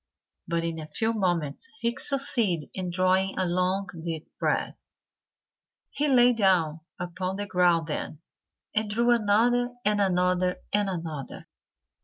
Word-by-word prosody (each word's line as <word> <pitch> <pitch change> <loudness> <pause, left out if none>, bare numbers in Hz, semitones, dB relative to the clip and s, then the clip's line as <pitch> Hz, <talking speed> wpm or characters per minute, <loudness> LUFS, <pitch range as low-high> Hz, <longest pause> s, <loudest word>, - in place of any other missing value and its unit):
But 170 0 0
in 165 -1 -3
a 155 - -7
few 225 +7 -1
moments 175 -8 -1
he 235 0 0
succeeded 235 - 0
in 185 -2 -3
drawing 185 +2 +1
a 185 - +1
long, 185 +2 0 0.2
deep 165 -2 -5
breath. - - 0 1.2
He 295 +1 0
lay 250 -3 +5
down 180 -8 +2 0.2
upon 185 +2 -3
the 205 +1 -3
ground 175 -4 +3
then 150 - -4 0.6
and 215 0 0
drew 235 +3 +2
another 240 +2 +2
and 210 0 +3
another 180 -1 +2 0.2
and 205 -1 +2
another. 165 -6 -5
185 Hz, 135 wpm, -27 LUFS, 175-220 Hz, 1.2 s, lay